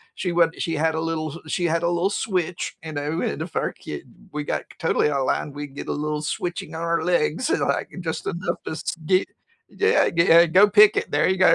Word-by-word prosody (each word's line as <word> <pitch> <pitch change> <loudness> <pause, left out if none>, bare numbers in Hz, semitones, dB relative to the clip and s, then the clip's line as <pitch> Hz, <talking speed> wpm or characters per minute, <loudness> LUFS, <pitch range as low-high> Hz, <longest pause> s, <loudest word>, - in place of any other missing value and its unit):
she 180 - -2
would 170 -1 +3
she 165 - -1
had 160 +1 +1
a 160 - -1
little 160 -1 -3
she 175 +3 -1
had 165 0 +1
a 170 - +2
little 175 +2 +1
switch, 185 -4 -2
and, 155 -2 -6
oh, 150 +3 -2
and 70 - -2
if - - -6
our - - -1
kid 75 - -8 0.3
we 150 -1 -4
got - - -2 0.2
totally 165 -2 +2
out 135 -2 0
line, 145 - -1
we'd 145 -1 -8
get - - -7
a - - 0
little 150 0 -2
switching 170 +1 -4
on 160 - -5
our 170 -1 0
legs, 175 - +1
and, - - +2
like, - - 0
just 165 -3 -4
enough 170 +2 -3
to - - -5
s 160 - -4
get 185 +3 +2 0.4
yeah 445 +3 +2
get 170 +1 +2 0.2
a - - -4
go 190 +6 +6
pick 210 +1 +7
it - - -2
there 145 +1 +2
you 190 - +1
go, 185 - +6
165 Hz, 240 wpm, -23 LUFS, 150-180 Hz, 0.4 s, pick